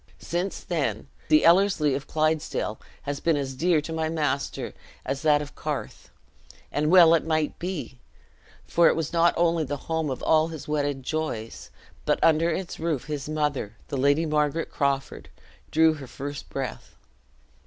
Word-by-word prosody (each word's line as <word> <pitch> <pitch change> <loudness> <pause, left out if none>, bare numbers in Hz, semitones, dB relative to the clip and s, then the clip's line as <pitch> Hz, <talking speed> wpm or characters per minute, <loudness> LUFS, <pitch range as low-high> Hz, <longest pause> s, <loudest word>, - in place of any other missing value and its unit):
Since 175 +3 -3
then, - - -2 0.2
the 310 0 +5
Ellerslie 170 -4 +4
of 140 +1 -4
Clydesdale 155 -8 -1 0.2
has 145 0 -3
been 165 -3 +2
as 135 -2 -3
dear 165 +3 +2
to 165 +2 -6
my 160 -1 -1
master 150 -3 -2 0.3
as 135 0 -2
that 150 -2 +3
of 145 0 -11
the - - -19
Carth; 150 -2 -5 0.6
and 150 +1 0
well 170 -2 +8
it 165 - +3
might 155 -2 -1
be, 170 -8 -5 0.7
for 170 0 +4
it - - +4
was 160 0 -3
not 170 0 +4
only 170 -1 +2
the 145 0 -3
home 160 -2 -1
of 130 - -4
all 155 0 +4
his 160 -3 -8
wedded 145 -3 -1
joys, 125 -8 -4 0.3
but - - +2
under 165 +1 +4
its 175 +2 -4
roof 155 -6 -1
his 150 -1 -4
mother, 150 -8 -1
the 140 - -2
Lady 145 +5 +3
Margaret 150 +1 0
Crawford, 140 -2 -2 0.4
drew 160 0 +4
her 140 -4 -9
first 145 +3 -7
breath. 135 -4 -5
155 Hz, 165 wpm, -26 LUFS, 140-165 Hz, 0.7 s, well